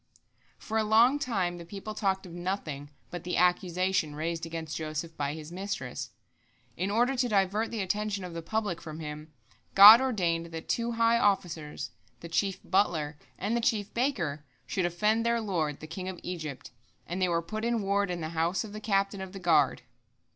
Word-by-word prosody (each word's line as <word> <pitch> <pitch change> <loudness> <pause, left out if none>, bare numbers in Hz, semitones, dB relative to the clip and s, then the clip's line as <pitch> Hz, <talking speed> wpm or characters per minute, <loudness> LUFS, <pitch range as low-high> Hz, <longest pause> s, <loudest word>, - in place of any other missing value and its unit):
For 220 0 -2
a - - +2
long 230 +6 +5
time 185 -10 -1
the - - -7
people 200 +5 -7
talked 195 -3 0
of 175 - -10
nothing 175 -6 -4 0.2
but 175 -1 -6
the 180 - -2
accusation 180 -2 +1
raised 165 +2 -3
against 160 -1 -5
Joseph 160 +1 -4
by 145 0 -2
his 155 0 -9
mistress. 180 -9 -4 0.7
In 185 +3 -1
order 240 +6 +2
to 245 -1 +1
divert 205 +2 +1
the 220 -4 -2
attention 205 +1 -2
of 180 -2 -7
the 165 - -4
public 205 0 -2
from 155 -1 -8
him, 150 0 -7 0.4
God 210 +5 +12
ordained 175 -10 0
that 165 -1 -8
two 235 0 0
high 230 0 +3
officers, 175 -8 -1 0.3
the 170 - -8
chief 195 +3 0
butler 160 -6 +1 0.2
and 210 +5 -1
the 235 - +1
chief 210 -3 0
baker, 185 - -1 0.2
should 185 -2 0
offend 210 +6 +1
their 235 0 +2
lord, 165 -9 -2
the - - -6
king 185 +4 -5
of 185 - -7
Egypt, 155 -10 -6 0.3
and 180 +2 -4
they 185 - +3
were 170 -1 +1
put 215 +5 -5
in 235 -2 0
ward 200 0 +1
in 175 -1 -3
the 155 - -3
house 165 +4 0
of 210 -2 -9
the 215 - -7
captain 195 -2 0
of 190 0 -7
the 195 - -7
guard. 155 -6 +3
185 Hz, 190 wpm, -29 LUFS, 165-210 Hz, 0.7 s, God